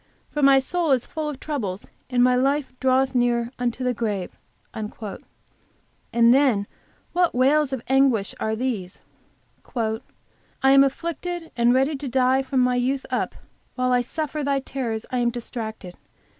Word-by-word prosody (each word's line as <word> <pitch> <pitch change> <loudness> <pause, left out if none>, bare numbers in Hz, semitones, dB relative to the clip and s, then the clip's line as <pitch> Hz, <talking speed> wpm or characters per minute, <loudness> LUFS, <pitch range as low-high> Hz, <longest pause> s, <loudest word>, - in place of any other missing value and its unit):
For 295 - -2
my 275 -1 +7
soul 330 +5 0
is 250 -2 +1
full 310 -1 -4
of 280 -3 -6
troubles; 215 -13 -4 0.2
and 245 -1 +3
my 250 0 +5
life 275 +2 +1
draweth 260 +1 +2
near 240 -1 +1
unto 245 +1 -2
the 250 0 +1
grave." 210 -5 -3 0.4
And 215 -1 -6 1.4
then 255 -7 +3 0.5
what 355 -4 +2
wails 275 +3 +3
of 260 -3 -3
anguish 265 -6 +3
are 220 0 -1
these! 220 -7 -3 0.7
"I 220 -2 0 0.6
am 275 +1 +7
afflicted, 335 +4 -3
and 235 0 +4
ready 270 +3 +2
to 280 0 -5
die 260 +1 +3
from 265 -1 0
my 250 0 +2
youth 260 +2 0
up, - - -1 0.4
while 255 0 0
I 250 0 +4
suffer 305 +3 -3
thy 280 0 +1
terrors 235 -5 -4
I 250 - 0
am 240 -1 +2
distracted. 225 -5 -6
255 Hz, 155 wpm, -24 LUFS, 235-275 Hz, 1.4 s, my